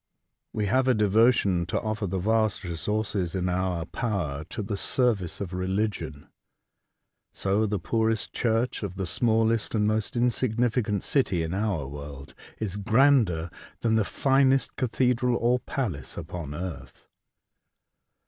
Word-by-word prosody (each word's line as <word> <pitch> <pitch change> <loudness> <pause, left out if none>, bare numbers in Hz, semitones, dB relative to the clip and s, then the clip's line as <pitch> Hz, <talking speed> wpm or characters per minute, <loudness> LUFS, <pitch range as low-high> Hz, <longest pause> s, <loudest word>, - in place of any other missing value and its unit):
We 105 - -1
have 130 +6 +2
a 130 - +4
devotion 105 -4 +3
to - - 0
offer 110 -2 -2
the 95 +2 -2
vast 110 +2 +1
resources 95 +1 -2
in 90 -1 0
our 90 -2 -1
power 90 -13 -2
to 105 - -5
the 100 +1 -3
service 105 -5 0
of 95 -3 -5
religion. 95 -5 -2 1.0
So 100 +3 0
the 105 0 -1
poorest 110 +4 -1
church 115 +1 0
of 100 -4 -4
the 95 0 -3
smallest 115 +4 +1
and 105 -1 +2
most 110 +1 -1
insig 120 -1 +1
nificant 115 -4 +1
city 95 - +1
in 80 +2 -3
our 95 -8 -1
world 70 -1 -9 0.2
is 105 -3 -2
grander 110 - +3 0.3
than 115 -1 +1
the 110 -1 +3
finest 135 +3 +2
cathedral 125 0 +1
or 120 +2 +2
palace 95 - -4
upon 80 -3 -6
earth. 85 -4 -7
105 Hz, 140 wpm, -27 LUFS, 90-115 Hz, 1.0 s, a